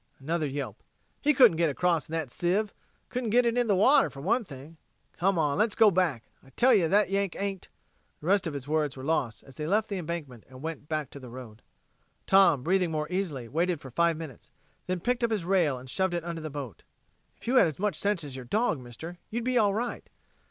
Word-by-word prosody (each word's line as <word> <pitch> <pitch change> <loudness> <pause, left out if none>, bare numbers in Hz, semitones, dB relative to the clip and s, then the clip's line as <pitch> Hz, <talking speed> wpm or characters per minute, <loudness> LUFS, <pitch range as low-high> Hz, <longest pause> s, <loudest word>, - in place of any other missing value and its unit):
Another 155 +3 -1
yelp. 140 0 -5 0.4
"He 300 - +4
couldn't 245 - +6
get 165 -1 +3
across 165 0 0
in - - -8
that 160 -6 -2
sieve. 195 - 0 0.4
Couldn't 250 -2 -2
get 245 +3 +4
it - - +4
into 240 0 0
the 205 - +3
water, 235 +10 +5
for 135 - -11
one 220 - +1
thing. 145 -1 -12 0.4
Come 190 +1 +2
on, 150 0 +1
let's 215 0 +2
go 220 -2 +6
back. 165 -11 +1 0.2
I 135 - -18
tell 245 - +4
ye 185 -7 +4
that 200 +3 +3
Yank 195 -2 0
ain't...." 195 -1 -4 0.5
The - - -12
rest 195 +1 +2
of 155 - -4
his 140 -1 -6
words 150 -3 0
were 130 - -8
lost 135 -7 -1
as 135 - -15
they 150 - -3
left 210 +5 +1
the 200 -2 -2
embankment 155 -9 -6
and 130 +1 -12
went 160 -2 -6
back 155 -3 -2
to 140 - -9
the 130 -2 -10
road. 115 -3 -10 0.6
Tom, 175 -9 +5
breathing 180 +1 +2
more 155 -1 -1
easily, 165 -10 -2
waited 170 +5 0
for 130 - -11
five 170 +4 +2
minutes, 155 -7 -9 0.4
then 180 -1 -2
picked 245 +3 0
up 235 - +3
his 210 -6 -1
rail 175 -8 +2
and 125 +1 -11
shoved 185 +7 0
it 170 - -2
under 170 -1 -5
the 155 - -5
boat. 135 - -7 0.6
"If - - -15
you 255 +2 +3
had 195 - +7
as 155 - -5
much 205 +1 -1
sense 200 -4 0
as 140 -3 -7
your 130 -1 -7
dog, 210 - 0
mister, 145 +9 -9
you'd 235 +2 -3
be 250 0 +2
all 205 -2 +3
right." 240 +2 -4
170 Hz, 235 wpm, -28 LUFS, 145-200 Hz, 0.6 s, had